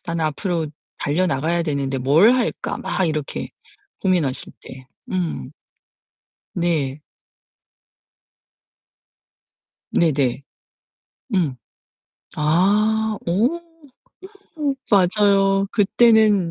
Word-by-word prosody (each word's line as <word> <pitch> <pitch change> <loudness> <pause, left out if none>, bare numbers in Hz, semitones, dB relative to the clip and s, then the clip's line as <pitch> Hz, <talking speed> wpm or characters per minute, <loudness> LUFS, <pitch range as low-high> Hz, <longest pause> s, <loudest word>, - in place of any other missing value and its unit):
'나는 170 -1 -2
앞으로 160 +1 -2 0.3
달려 160 +6 0
나가야 165 +2 0
되는데 140 -3 -2
뭘 150 - +5
할까?' 245 -2 -2
막 180 +2 -1
이렇게 155 -3 -3 0.5
고민하실 175 -9 0
때 130 0 -12 0.3
음. 170 - -3 1.0
네. 155 -5 -1 2.9
네네. 140 -5 +1 0.9
음. 160 -9 0 0.8
아, 210 +7 +2
오. 230 - +1 1.0
오 290 -3 -1 0.2
맞아요. 195 0 +3
그때는 215 -3 +4
175 Hz, 140 characters per minute, -21 LUFS, 150-205 Hz, 2.9 s, 뭘